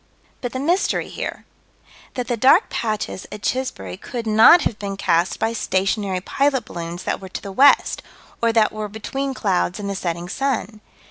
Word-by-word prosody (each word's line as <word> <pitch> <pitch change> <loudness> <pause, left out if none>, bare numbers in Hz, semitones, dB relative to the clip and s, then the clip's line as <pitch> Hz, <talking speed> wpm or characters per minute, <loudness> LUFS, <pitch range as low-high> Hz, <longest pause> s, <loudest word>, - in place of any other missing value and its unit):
But 245 - -3
the 260 - -4
mystery 345 +8 0
here: - - -6 0.7
That 250 -2 -3
the 245 - 0
dark 265 - +4
patches 215 -4 -3
at 210 - -8
Chisbury 95 - -3
could 235 - -6
not 220 +11 +7
have 215 - -2
been 200 -1 -4
cast 170 -1 +1
by 225 +1 0
stationary 195 -2 -1
pilot 270 +2 0
balloons 170 0 -6
that - - -2
were 190 - -9
to - - -6
the 200 - -6
west, 270 +8 +4 0.4
or 230 0 +3
that 225 -2 +3
were 215 0 -4
between 270 +6 -4
clouds 190 -3 0
and 205 - -4
the 200 - -2
setting 175 -2 -3
sun. 225 -2 -2
215 Hz, 180 wpm, -21 LUFS, 190-255 Hz, 0.7 s, not